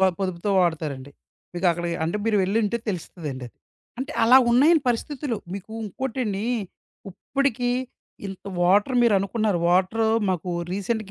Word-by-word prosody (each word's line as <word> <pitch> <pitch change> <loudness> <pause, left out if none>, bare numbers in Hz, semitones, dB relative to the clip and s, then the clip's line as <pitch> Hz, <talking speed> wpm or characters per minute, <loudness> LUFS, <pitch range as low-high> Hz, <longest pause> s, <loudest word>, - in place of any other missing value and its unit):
బా 190 - +6
పొదుపుతో 185 +1 -2
వాడతారండి. 150 -5 -1 0.4
మీకక్కడికి 175 -1 0
అంటే 170 +6 -1
మీరు 220 -2 +2
వెళ్లుంటే 215 +4 +1
తెలుస్తదండి 155 -8 -5
అది. - - -28 0.5
అంటే, 275 +3 -4
అలా 245 +3 +7
ఉన్నాయండి 290 +6 +5
పరిస్థితులు. 250 +1 -2 0.2
మీకు 200 +3 -8
ఇంకోటండి, 220 -2 -3 0.7
ఇప్పడికీ 250 +3 -1 0.6
ఇంత 190 -1 -8 0.2
వాటర్ 205 +8 +3
మీరనుకున్నారు. 205 -2 +2
వాటర్ 190 +5 +2 0.3
మాకు 180 0 -2 0.2
రీసెంట్‌గా 200 +1 -2
200 Hz, 120 wpm, -24 LUFS, 180-235 Hz, 0.7 s, అలా